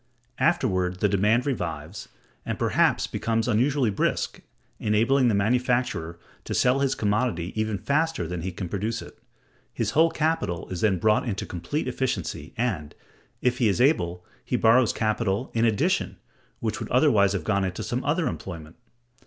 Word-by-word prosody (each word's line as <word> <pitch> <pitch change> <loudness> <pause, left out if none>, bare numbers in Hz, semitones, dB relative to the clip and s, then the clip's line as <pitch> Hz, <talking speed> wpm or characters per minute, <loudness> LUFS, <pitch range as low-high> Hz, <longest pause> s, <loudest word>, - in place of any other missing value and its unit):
Afterward 90 -1 +1
the 105 - +3
demand 105 +5 +2
revives, 90 - -4 0.3
and - - -3
perhaps - - +2
becomes 115 0 -1
unusually 125 +1 +2
brisk, 100 - -1 0.4
enabling 115 +5 +3
the 110 - +2
manufacturer 120 -5 0 0.3
to - - -4
sell 125 +2 +3
his 135 -1 +1
commodity 105 -5 -1
even 110 -1 -1
faster 140 - 0
than 90 0 -4
he 95 +3 -3
can 90 +1 -5
produce 105 +5 -3
it; - - -14 0.5
his - - -2
whole 165 +2 +4
capital 160 - -1
is 90 -2 -4
then 100 -4 +3
brought 110 +5 +2
into 100 -3 -3
complete 90 - -3
efficiency, 90 - -3
and, 100 -11 -2 0.5
if 125 0 +1
he 120 - +3
is 100 +2 +1
able, 90 - +2 0.2
he - - -2
borrows 115 +1 +4
capital 110 0 -1
in 115 0 +2
addition, 110 -3 +1 0.4
which - - -2
would - - -6
otherwise 100 -1 +4
have 100 - -2
gone 100 -2 +1
into 95 -1 -3
some 125 +2 -2
other 160 +4 +1
employment. 80 - -6
110 Hz, 160 wpm, -25 LUFS, 90-125 Hz, 0.5 s, whole